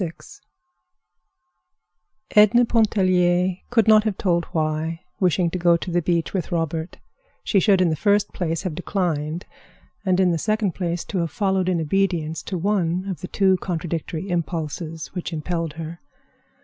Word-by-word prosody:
VI 170 - -2 2.2
Edna 215 +3 +6
Pontellier 185 -5 +2
could 225 -3 +3
not 215 -1 +7
have 215 -3 -2
told 170 -3 +1
why, 160 +1 -2 0.2
wishing 180 -2 +2
to 180 - -3
go 170 -1 +4
to 175 - -6
the 175 +1 +2
beach 170 0 0
with 190 -1 -3
Robert, 165 0 -2 0.5
she 200 - +2
should 195 -1 +4
in 175 -3 +3
the - - 0
first 205 +4 +1
place 165 -2 -2
have 185 -4 -3
declined, 170 -2 -2 0.6
and 185 -2 +2
in 185 -2 +4
the 165 - 0
second 215 -1 0
place 175 -1 -3
have 170 -3 0
followed 190 +4 0
in 180 -2 +1
obedience 165 -1 0
to 185 - -4
one 180 -1 0
of 175 -5 -5
the 180 - -5
two 190 -1 +2
contradictory 170 0 -4
impulses 165 -1 -4
which 180 -1 -4
impelled 165 0 -3
her. 165 +1 -7
175 Hz, 155 wpm, -23 LUFS, 165-190 Hz, 2.2 s, not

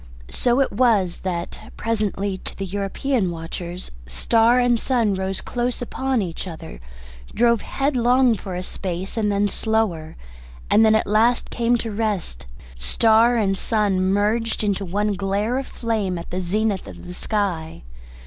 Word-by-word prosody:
So 245 +1 +2
it 270 - +1
was 205 -6 +2
that 175 -2 -5
presently 205 -3 -1
to - - -7
the 195 - -3
European 200 +3 -1
watchers 170 +2 -6 0.2
star 225 - +3
and 245 -1 +3
sun 235 -6 +1
rose 190 0 -2
close 245 0 -2
upon 255 -1 -1
each 175 +1 -5
other, 160 - -8 0.6
drove 235 -1 +3
headlong 255 -2 +2
for 190 -3 -5
a 180 - -3
space 185 0 -4
and 215 -2 +1
then 200 +1 +2
slower, 205 -8 -1 0.6
and 220 +1 +6
at 220 0 +3
last 225 +4 +2
came 240 0 +2
to 225 -1 -4
rest, 200 - -2 0.3
star 225 - +3
and 195 -3 +1
sun 205 -2 +1
merged 210 +4 +1
into 200 -1 0
one 205 +3 0
glare 200 +5 -1
of 270 - -6
flame 215 -6 -2
at 170 - -8
the 185 +1 -2
zenith 200 +2 -1
of - - -10
the 180 - -7
sky. 180 - -2
205 Hz, 150 wpm, -22 LUFS, 185-230 Hz, 0.6 s, and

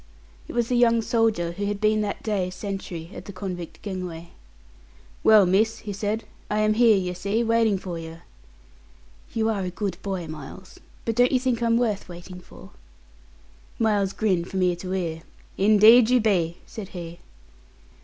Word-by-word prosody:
It - - -8
was 240 -1 +1
the 250 - +1
young 230 -1 +4
soldier 220 -8 +1
who 200 +4 -4
had 205 0 -2
been 215 0 +2
that 205 -1 -4
day 200 -4 -1
sentry 185 -3 -6
at - - -9
the - - -7
convict 180 -3 -7
gangway. 180 -4 -6 0.9
"Well, 215 -3 +7
miss," 210 +5 +2
he 205 - -4
said, 210 +3 -2 0.3
"I 210 - 0
am 215 0 +3
here, 225 -2 +5
yer 180 -1 -2
see, 200 +6 -1
waiting 225 -3 +2
for 180 -3 -6
yer." 165 +1 -9 1.1
"You 220 -1 +1
are 215 -3 0
a 185 - -2
good 190 0 -4
boy, 190 -3 -3
Miles; 155 +4 -10 0.3
but 230 - -1
don't 245 +1 +4
you 255 - +3
think 250 -2 -1
I'm 230 0 +3
worth 215 -5 -1
waiting 175 +1 -10
for?" 95 - -15 1.1
Miles 205 -3 +1
grinned 185 -5 0
from 190 -1 -1
ear 180 -1 +2
to 185 +1 -6
ear. 165 -4 -3 0.3
"Indeed 215 +4 +6
you 250 0 +4
be," 180 -6 +1
said 215 -4 -8
he. 170 -1 -8
200 Hz, 175 wpm, -24 LUFS, 180-220 Hz, 1.1 s, Well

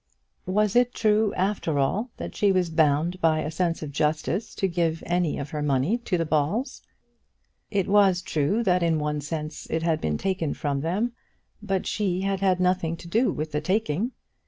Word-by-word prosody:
Was 210 +2 +1
it 245 0 +3
true 215 -1 +3
after 185 -5 0
all 195 - 0
that - - -6
she 205 -1 +3
was 180 -3 +1
bound 160 +3 +2
by 155 -1 +3
a 155 - -3
sense 165 0 -1
of 150 - -5
justice 155 +7 -1
to 195 - +1
give 170 -2 -1
any 175 -2 0
of 140 -1 -5
her 150 - -3
money 145 - +1
to 210 -6 -1
the 165 - 0
Balls? 160 - -1 0.9
It 200 -3 0
was 195 -3 +4
true 180 +11 0
that 180 -3 +2
in 165 -2 +2
one 150 0 -1
sense 155 +1 -5
it 160 0 -1
had 165 -2 +1
been 75 -1 0
taken 185 -6 -1
from 140 -2 -2
them, 195 +10 0 0.5
but 195 -3 -1
she 190 -4 -1
had 195 0 -1
had 190 -2 +2
nothing 180 -2 +1
to 170 - -11
do 230 +8 +2
with 155 +1 -4
the 150 - -1
taking. 195 - 0
175 Hz, 190 wpm, -25 LUFS, 155-195 Hz, 0.9 s, was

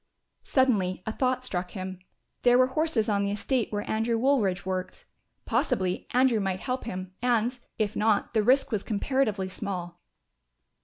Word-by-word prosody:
Suddenly 200 -9 +2
a 220 - -1
thought 255 +2 0
struck 180 -5 -3
him, 185 0 -5 0.4
there 245 0 +5
were 255 - +6
horses 285 -5 0
on 205 -2 +1
the 200 - 0
estate 225 +4 -1
where 205 -1 -3
Andrew 225 +1 0
Woolridge 225 -9 +1
worked. 185 -1 -4 0.4
Possibly 185 -1 0
Andrew 250 -2 +3
might 190 -2 -2
help 255 -1 -3
him 185 -4 -5
and, 245 0 +1 0.2
if 215 -1 -1
not, 215 0 +1
the 220 - +3
risk 260 +5 +3
was 215 -3 0
comparatively 215 -3 0
small. 180 -3 -5
215 Hz, 155 wpm, -27 LUFS, 190-250 Hz, 0.4 s, were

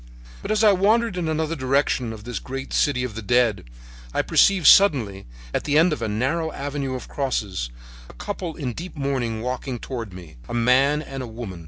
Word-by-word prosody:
"But - - -7
as 215 0 +2
I 215 - +7
wandered 215 +3 +2
in 175 -3 -2
another 160 +1 -1
direction 130 -3 0
of 110 -1 -9
this 120 +1 -4
great 135 +1 -6
city 135 -4 +2
of 125 -3 -4
the 115 - -6
dead 115 - +2 0.5
I - - +2
perceived 190 -5 +3
suddenly, 120 - +5 0.3
at - - -1
the 150 0 +2
end 165 +1 +5
of 125 - -5
a 115 - -1
narrow 135 +10 -1
avenue 140 -1 -4
of 125 - -7
crosses, 105 - -2 0.4
a - - -12
couple 185 -5 -5
in 130 -7 -4
deep 175 +6 -8
mourning 130 -6 -2
walking 125 0 -3
toward 115 -4 -6
me, 85 -6 -12
a 120 - -3
man 135 +5 +3
and 135 -2 -7
a 125 - -5
woman. 110 -6 -7
130 Hz, 200 wpm, -23 LUFS, 115-160 Hz, 0.5 s, I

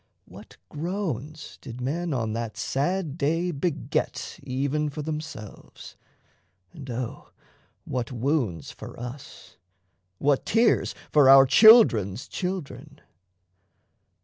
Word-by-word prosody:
What - - -14
groans 155 - -5
did 120 +1 -9
men 160 +7 -2
on 115 -5 -2
that 115 -1 -5
sad 160 +2 -2
day 165 +5 0
beget 160 +1 -3
Even 140 +4 -2
for 150 +1 -6
themselves, 150 -9 -8 0.8
and 135 -2 -10
O 120 0 -5 0.6
what 125 0 -3
wounds 120 - -2
for - - -11
us, 125 +3 -10 0.6
What 140 +3 +1
tears 230 +2 +2 0.2
for 145 -3 +5
our 135 0 +9
children's 130 - +6
children! 180 -5 -6
140 Hz, 100 wpm, -25 LUFS, 125-165 Hz, 0.8 s, our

